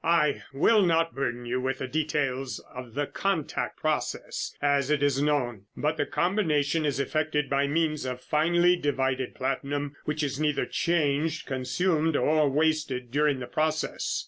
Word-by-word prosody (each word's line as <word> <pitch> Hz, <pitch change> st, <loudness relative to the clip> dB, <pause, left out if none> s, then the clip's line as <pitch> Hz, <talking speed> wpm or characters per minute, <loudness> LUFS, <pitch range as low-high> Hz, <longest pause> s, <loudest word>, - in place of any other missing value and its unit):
I 160 Hz, -4 st, +2 dB
will 205 Hz, +11 st, +4 dB
not 165 Hz, -1 st, +2 dB
burden 120 Hz, -3 st, -3 dB
you 125 Hz, +2 st, -1 dB
with 135 Hz, +1 st, -1 dB
the 130 Hz, -, -4 dB
details 135 Hz, -3 st, -1 dB, 0.2 s
of 125 Hz, -2 st, -9 dB
the 145 Hz, 0 st, 0 dB
'contact' 170 Hz, -1 st, -2 dB
process, -, -, -2 dB
as 140 Hz, -1 st, +2 dB
it 150 Hz, -1 st, +2 dB
is 140 Hz, -1 st, +2 dB
known, 125 Hz, -9 st, 0 dB
but 150 Hz, +2 st, 0 dB
the 145 Hz, -2 st, -1 dB
combination 160 Hz, -5 st, +1 dB
is 140 Hz, -, -1 dB
effected 150 Hz, +1 st, 0 dB
by 140 Hz, 0 st, +2 dB
means 155 Hz, 0 st, 0 dB
of 125 Hz, -1 st, -3 dB
finely 175 Hz, +6 st, +3 dB
divided 130 Hz, -5 st, -1 dB
platinum 140 Hz, +2 st, -2 dB
which 150 Hz, 0 st, -1 dB
is 140 Hz, -1 st, -2 dB
neither 150 Hz, -2 st, +1 dB
changed, 160 Hz, -1 st, 0 dB
consumed 155 Hz, +5 st, 0 dB
or 155 Hz, -1 st, +3 dB
wasted 145 Hz, -4 st, 0 dB
during 145 Hz, -1 st, +2 dB
the -, -, -3 dB
process. 155 Hz, +5 st, -1 dB
145 Hz, 155 wpm, -27 LUFS, 135-155 Hz, 0.2 s, will